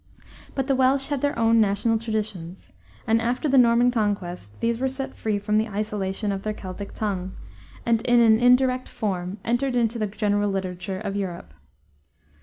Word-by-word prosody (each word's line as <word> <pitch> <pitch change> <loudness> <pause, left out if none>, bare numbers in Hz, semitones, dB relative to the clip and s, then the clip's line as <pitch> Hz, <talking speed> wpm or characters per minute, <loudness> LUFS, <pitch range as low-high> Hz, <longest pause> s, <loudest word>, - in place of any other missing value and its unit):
But 270 - 0
the 270 0 +1
Welsh 265 +1 +2
had 285 -3 -1
their 285 -3 0
own 230 0 +4
national 215 +2 +1
traditions, 210 -6 -5 0.3
and 225 +1 +2
after 245 +6 -1
the 270 -1 +5
Norman 240 0 +5
Conquest 190 - -3
these 230 0 0
were 265 +1 0
set 265 +1 -5
free 215 -2 -2
from 210 +1 +1
the 220 - 0
isolation 205 -1 -2
of 195 -1 -3
their 215 +1 -3
Celtic 195 +1 -7
tongue 190 -3 -3 0.5
and, 230 -1 +2
in 240 0 +3
an 225 -1 +5
indirect 255 +1 +3
form, 185 -2 -3
entered 245 +2 0
into 235 -1 +1
the 215 - 0
general 205 0 0
literature 190 0 -3
of 200 -1 -4
Europe. 180 - -5
215 Hz, 175 wpm, -24 LUFS, 200-240 Hz, 0.5 s, the